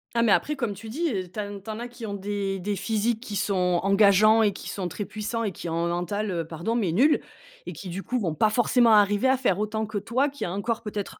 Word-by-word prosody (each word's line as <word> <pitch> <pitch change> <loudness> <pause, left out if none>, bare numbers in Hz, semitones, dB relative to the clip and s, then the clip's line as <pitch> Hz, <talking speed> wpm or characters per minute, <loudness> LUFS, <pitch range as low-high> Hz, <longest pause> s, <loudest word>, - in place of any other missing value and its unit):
Ah, 235 - +3
mais 225 -3 +3
après, 300 +7 +2
comme 235 -6 -2
tu 220 +3 -10
dis, 315 +6 -1
heu, 185 -3 -3
tin 205 +2 -6
tu 200 - -23
en 215 - -6
as 240 - -5
qui 240 -1 -9
ont 205 - -4
des 200 -1 -3
des 205 +3 -2
physiques 220 +3 0
qui 215 -4 -7
sont 180 -3 +1
engageants, 205 +3 +5
et 205 - +2
qui - - -8
sont 185 -3 -3
très 200 +4 -5
puissants, 220 +2 -4
et 205 - -1
qui 175 - -8
ont 165 +1 -1
un - - 0
mental, 200 +5 -2
heu, 170 -3 -2
pardon 170 +8 -3
mais 200 -8 +1
nul, 275 - +4 0.5
et - - -6
qui, 190 - -8
du 190 +3 -5
coup, 250 0 -1
vont 165 -7 -2
pas 215 +7 +3
forcément 240 0 +4
arriver 205 +3 +4
à 260 0 +4
faire 220 -8 +1
autant 215 +1 -2
que 215 -1 -4
toi 255 +8 0
qui 285 - -5
as 175 - -4
un 200 +2 -3
corps 230 +2 -2
peut-être 210 -2 -5
210 Hz, 275 wpm, -26 LUFS, 195-230 Hz, 0.5 s, engageants